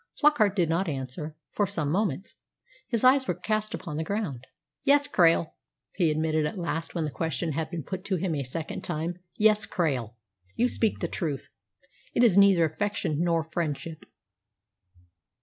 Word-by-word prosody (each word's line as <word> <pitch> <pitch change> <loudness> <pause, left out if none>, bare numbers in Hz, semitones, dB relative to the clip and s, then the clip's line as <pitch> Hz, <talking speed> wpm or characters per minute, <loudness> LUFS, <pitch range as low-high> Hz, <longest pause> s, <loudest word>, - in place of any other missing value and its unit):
Flockart 245 -10 +4
did 175 -5 +2
not 165 +3 0
answer 145 +3 -5 0.2
for 205 - +1
some 155 -7 -2
moments. 195 0 -1 0.5
His 235 -2 -1
eyes 260 +1 +5
were - - 0
cast 215 -1 -1
upon 150 -5 -6
the 160 - -1
ground. 160 - -3 0.4
"Yes, 285 +1 +4
Krail," 165 - +3 0.4
he 175 -4 +2
admitted 155 0 +1
at 150 - -6
last 165 -1 -3
when 170 - 0
the 150 - -3
question 165 +2 -2
had 155 +2 -2
been 165 -2 -5
put 185 +3 -5
to 195 - 0
him 180 -1 -1
a 145 - -1
second 155 +6 -5
time 170 +1 -3 0.2
"yes, 215 -1 +4
Krail. 130 - -1 0.4
You 245 - +3
speak 225 -3 0
the - - 0
truth. 150 -6 -3 0.7
It 240 - +4
is 220 -7 +6
neither 195 -4 +6
affection 160 -1 -1
nor 170 -1 +2
friendship." 160 -1 -4
170 Hz, 165 wpm, -27 LUFS, 155-205 Hz, 0.7 s, is